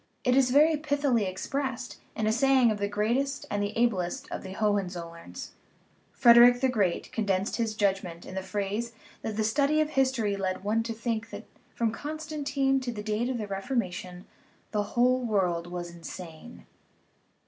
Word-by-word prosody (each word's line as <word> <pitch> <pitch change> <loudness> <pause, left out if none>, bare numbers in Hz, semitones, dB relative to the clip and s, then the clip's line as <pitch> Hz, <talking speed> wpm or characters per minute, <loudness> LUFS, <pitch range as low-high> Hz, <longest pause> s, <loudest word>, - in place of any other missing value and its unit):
It 250 -1 +3
is 265 -2 +4
very 300 +4 +5
pith'ly 285 -5 +1
expressed 255 +6 -4 0.2
in 220 - -1
a 215 - +3
saying 255 0 +4
of 210 - -3
the 200 - 0
greatest 235 +7 -1
and 205 - 0
the 205 0 -1
ablest 235 +2 0
of - - -4
the 190 -1 -8
Hohenzollerns; 180 - -3 0.6
Frederick 240 +1 +7
the 265 0 +2
Great 200 -8 0
con 220 -2 -1
densed 190 0 0
his 225 -2 -1
judgment 190 -5 -1
in - - -9
the 190 - -2
phrase 205 +4 -3 0.3
that 215 -1 -4
the 220 - +1
study 280 +7 +2
of 310 0 +1
his 270 -2 +3
tory 215 -6 -1
led 190 -1 -2
one 215 +3 +1
to 230 0 -3
think 230 0 -3
that - - -8 0.3
from 230 -2 +1
Constantine 290 -1 -1
to 255 -2 -3
the 210 -3 -6
date 220 +3 -1
of 260 - -1
the 215 - -3
Reformation 195 -4 -3 0.5
the 210 - +1 0.2
whole 255 +1 +4
world 180 -7 0
was 175 -1 -5
insane. 170 +4 -10
225 Hz, 175 wpm, -28 LUFS, 195-260 Hz, 0.6 s, Frederick